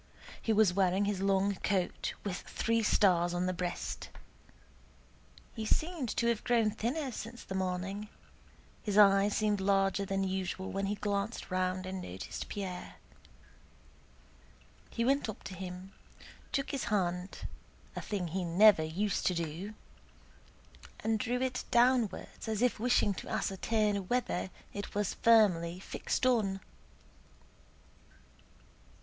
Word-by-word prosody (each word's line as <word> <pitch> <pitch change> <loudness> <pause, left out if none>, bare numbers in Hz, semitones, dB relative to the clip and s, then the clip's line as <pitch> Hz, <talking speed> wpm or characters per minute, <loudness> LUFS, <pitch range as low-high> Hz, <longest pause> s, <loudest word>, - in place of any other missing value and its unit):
He 225 - 0
was 215 -4 +4
wearing 190 +1 +2
his 200 -2 -1
long 195 0 +2
coat 190 -3 -1
with 190 -3 -2
three 230 0 -1
stars 175 -5 +3
on 175 - 0
his 185 0 -1
breast. 175 0 -4 1.4
He 225 - -5
seemed 310 +3 0
to 235 - +2
have 235 -2 +1
grown 230 -3 +3
thinner 255 +6 -2
since 235 +1 -7
the - - -7
morning; 190 +2 -2 0.7
his 205 -2 -1
eyes 200 0 +6
seemed 210 -2 +1
larger 195 0 +2
than 195 0 -1
usual 190 0 -2
when 195 0 -1
he 205 - -1
glanced 205 +1 -2
round 185 0 0
and 185 0 -4
noticed 95 - -6
Pierre. 190 -3 -5 1.9
He 230 - -1
went 275 -2 +2
up 215 - -7
to - - -7
him, 185 +1 -7 0.6
took 275 0 -1
his 275 - -2
hand 180 -2 -1 0.5
(a - - -3
thing 190 -5 -3
he 185 +3 -2
never 185 +2 +6
used 185 +6 -1
to 180 - +2
do), 170 +6 -4 1.3
and 220 0 +1
drew 245 +3 0
it 255 -1 -1
downwards 240 -2 +2
as 220 +1 0
if 250 - +2
wishing 235 -3 +3
to - - -8
ascertain 205 0 0
whether 245 -4 0 0.2
it 200 0 -6
was 205 -2 0
firmly 180 -7 +4
fixed 195 - -2
on. 210 -6 +2
200 Hz, 130 wpm, -32 LUFS, 185-220 Hz, 1.9 s, eyes